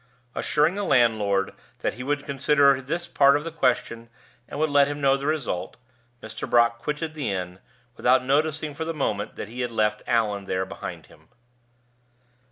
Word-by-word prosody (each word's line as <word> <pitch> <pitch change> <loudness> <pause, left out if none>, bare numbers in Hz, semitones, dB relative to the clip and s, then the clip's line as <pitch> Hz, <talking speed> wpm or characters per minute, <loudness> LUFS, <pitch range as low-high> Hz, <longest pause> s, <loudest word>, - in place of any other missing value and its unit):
Assuring 150 +3 +2
the 205 +1 -3
landlord 110 - +2 0.3
that - - -1
he 125 - -9
would 145 +2 -2
consider 140 0 +3
this 165 +6 -4
part 140 -3 +5
of 145 - -6
the 165 - -5
question 115 -6 -1 0.4
and - - -6
would 155 -1 +1
let 140 -1 +5
him 145 0 -4
know 135 -1 +4
the 140 +1 -4
result, 130 - -2 0.5
Mr. 110 - -6
Brock 120 -1 +3
quitted 150 +5 -3
the 145 -9 -3
inn, 90 -1 -4 0.4
without 130 +2 +3
noticing 150 +2 0
for 160 - -4
the 165 0 -4
moment 105 -8 -2
that - - -6
he 120 +3 -6
had 125 - -1
left 105 -2 0
Allan 105 -4 0
there 95 0 -1
behind 95 - -8
him. - - -21
135 Hz, 175 wpm, -25 LUFS, 110-150 Hz, 0.5 s, part